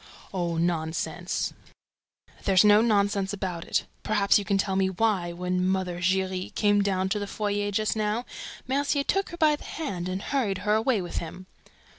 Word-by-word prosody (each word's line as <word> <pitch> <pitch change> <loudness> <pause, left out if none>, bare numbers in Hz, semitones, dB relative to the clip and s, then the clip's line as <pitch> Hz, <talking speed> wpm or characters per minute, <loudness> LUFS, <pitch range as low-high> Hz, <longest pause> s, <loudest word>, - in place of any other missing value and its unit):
"Oh, 175 -3 -1
nonsense!" 165 -1 -1 0.9
"There's 190 -2 +5
no 210 +1 +7
nonsense 200 -3 +2
about 180 -4 -4
it. - - 0 0.2
Perhaps 205 -1 +3
you - - -3
can 200 0 +1
tell 195 0 0
me 190 0 +2
why, 190 -3 0
when 180 +1 -1
Mother 185 -1 0
Giry 185 0 0
came 205 -1 +3
down 190 -2 +1
to 210 +2 0
the 205 - -4
foyer 205 0 -1
just 215 +2 0
now, 215 +3 -1 0.4
Mercier 280 +2 +1
took 390 +6 0
her 345 - -8
by 310 -2 +4
the - - -12
hand 185 - -4
and 185 +2 -3
hurried 225 -9 0
her 210 - +3
away 220 -2 +2
with 175 - -6
him?" 175 +3 -8
195 Hz, 175 wpm, -27 LUFS, 185-215 Hz, 0.9 s, no